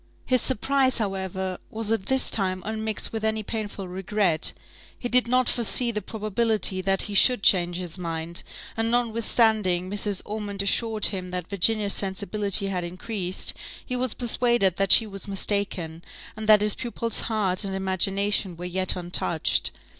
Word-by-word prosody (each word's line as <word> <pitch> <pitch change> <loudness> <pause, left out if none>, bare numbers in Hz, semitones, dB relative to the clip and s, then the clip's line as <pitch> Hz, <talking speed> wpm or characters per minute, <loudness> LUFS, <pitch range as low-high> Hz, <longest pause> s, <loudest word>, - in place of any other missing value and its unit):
His 255 -2 +2
surprise, 260 +2 +2
however, 190 -3 -3
was 220 0 -3
at 225 -4 -1
this 265 0 +3
time 185 -3 -1
unmixed 220 0 -3
with 220 -1 -4
any 220 0 0
painful 205 -3 -5
regret; 185 -2 0 0.5
he 245 - -4
did 250 0 +3
not 255 0 +2
foresee 240 +1 +1
the 210 -2 -3
probability 215 -2 -1
that 195 0 0
he 205 - -5
should 245 +2 +4
change 175 -2 +4
his 180 0 -5
mind; 165 -1 -4 0.3
and 225 0 +1
notwithstanding 220 -5 +2
Mrs. 205 -1 -1
Ormond 205 -2 -2
assured 220 +1 +1
him 185 -3 +2
that 180 0 -5
Virginia's 200 +2 +2
sensibility 200 +1 -1
had 185 -2 -2
increased, 185 +1 -2 0.3
he 250 - -4
was 250 -2 -2
persuaded 240 -6 +1
that 195 -1 +1
she 225 - +8
was 195 -1 -6
mistaken, 195 -4 -2 0.3
and 215 -1 -6
that 210 -1 +7
his 210 -1 +4
pupil's 235 -1 -3
heart 200 -4 0
and 195 -1 -3
imagination 190 0 0
were 175 - -6
yet 185 +1 0
untouched. 175 -2 0
200 Hz, 155 wpm, -25 LUFS, 185-225 Hz, 0.5 s, she